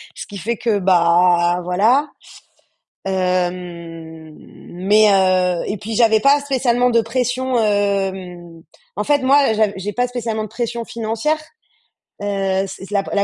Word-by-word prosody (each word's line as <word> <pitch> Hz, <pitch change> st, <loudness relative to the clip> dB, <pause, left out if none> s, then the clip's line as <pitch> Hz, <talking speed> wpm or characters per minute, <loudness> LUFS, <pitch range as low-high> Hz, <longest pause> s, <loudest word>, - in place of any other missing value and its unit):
Ce -, -, -7 dB
qui 205 Hz, -, -9 dB
fait 220 Hz, +6 st, -3 dB
que, 220 Hz, -2 st, 0 dB
bah, 175 Hz, -1 st, +3 dB
voilà. 220 Hz, +12 st, +2 dB, 1.0 s
Hem, 175 Hz, -4 st, -4 dB
mais 205 Hz, +4 st, 0 dB
heu 185 Hz, -2 st, +2 dB
et 205 Hz, -, -3 dB
puis 220 Hz, +3 st, -6 dB
j'avais 220 Hz, -1 st, +4 dB
pas 280 Hz, +5 st, +4 dB
spécialement 250 Hz, -3 st, +1 dB
de 230 Hz, -1 st, +3 dB
pression, 250 Hz, +2 st, -1 dB
hem 190 Hz, -5 st, -2 dB, 0.4 s
en 210 Hz, -, -1 dB
fait 290 Hz, +5 st, +2 dB
moi, 275 Hz, -2 st, +4 dB
j'av 215 Hz, -1 st, +1 dB
j'ai 200 Hz, +2 st, -5 dB
pas 245 Hz, +3 st, 0 dB
spécialement 230 Hz, -3 st, -3 dB
de 215 Hz, -, -7 dB
pression 235 Hz, 0 st, -4 dB
financière. 230 Hz, +7 st, -2 dB, 0.9 s
Heu, -, -, -3 dB
s 195 Hz, -1 st, -2 dB
la 200 Hz, -1 st, 0 dB
p -, -, -9 dB
la 200 Hz, -, +2 dB
205 Hz, 145 wpm, -19 LUFS, 180-235 Hz, 1.0 s, j'avais